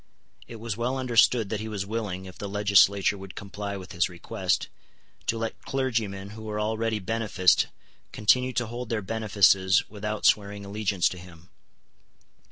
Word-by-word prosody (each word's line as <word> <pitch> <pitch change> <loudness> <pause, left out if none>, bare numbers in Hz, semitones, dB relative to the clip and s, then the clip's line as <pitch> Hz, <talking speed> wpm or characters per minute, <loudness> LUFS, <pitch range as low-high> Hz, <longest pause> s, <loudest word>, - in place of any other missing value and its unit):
It 120 - -9
was 115 -2 -4
well 120 +4 -1
understood 120 -3 +3
that 110 - -2
he 110 - -5
was 105 -3 -3
willing, 100 -3 -4
if 95 -1 -10
the 100 - -5
legislature 100 -1 +4
would 95 -2 -10
comply 100 0 -5
with 95 -1 -10
his 85 -2 +1
request, 85 -1 -2 0.6
to 115 - +1
let 115 0 -4
clergymen 110 -7 -2
who 110 +1 -10
were 105 -1 -4
already 110 +1 0
beneficed 105 -3 +2 0.4
continue 125 +5 +3
to 120 0 0
hold 120 +1 -6
their 110 -3 -1
benefices 100 -2 +3
without 105 0 -4
swearing 100 -1 +2
allegiance 100 -3 0
to 90 - -8
him. 90 0 -15
105 Hz, 160 wpm, -27 LUFS, 95-115 Hz, 0.6 s, legislature